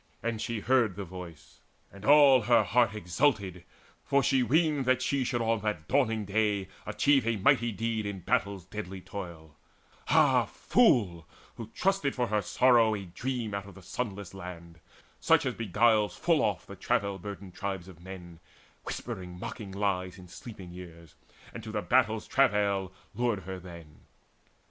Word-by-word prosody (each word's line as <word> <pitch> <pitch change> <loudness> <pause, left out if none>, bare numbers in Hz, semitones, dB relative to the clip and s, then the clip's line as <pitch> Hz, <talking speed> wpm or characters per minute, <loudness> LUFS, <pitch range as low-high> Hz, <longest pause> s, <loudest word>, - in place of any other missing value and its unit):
And 115 -1 -2
she 115 -2 -3
heard 120 -6 +2
the 100 0 -5
voice, 85 -3 -11 0.3
And 100 0 -13
all 140 -1 +7
her 120 +2 +4
heart 115 -4 +2
exulted, 100 - 0 0.4
for 140 -1 +2
she 135 - +3
weened 150 +1 +2
That 130 0 +3
she 140 0 0
should 120 -1 -1
on 115 -1 +1
that 105 -7 -3
dawning 115 -6 +1
day 100 -1 0 0.2
achieve 140 -5 +2
A 115 - +2
mighty 120 +3 +3
deed 110 0 -2
in 100 -2 -5
battle's 95 +1 -1
deadly 95 -1 -7
toil 85 -6 -9 0.5
Ah, - - +4
fool, 100 - +2 0.3
who 115 - -7
trusted 195 -7 +1
for 125 - +1
her 105 -1 +1
sorrow 115 +1 +4
a 100 -2 -6
dream 115 +4 -4
Out 100 0 -4
of 100 - -13
the 95 - -13
sunless 100 -1 -5
land, 85 -3 -9 0.4
such - - +3
as - - 0
beguiles 110 0 +2
Full - - +2
oft - - -1
the - - -9
travail 100 -1 -1
burdened 100 -1 -8
tribes 95 -2 -4
of 90 -3 -14
men, 90 -3 -10 0.5
Whispering 90 -1 -6
mocking 105 0 -7
lies 95 -2 -2
in 90 -1 -12
sleeping 95 -2 -10
ears, 85 -3 -12 0.4
And - - -8
to - - -7
the - - -2
battle's 110 0 +2
travail 100 -7 +2 0.2
lured 120 -5 0
her 95 +1 -6
then! 85 -4 -12
100 Hz, 165 wpm, -29 LUFS, 90-120 Hz, 0.5 s, all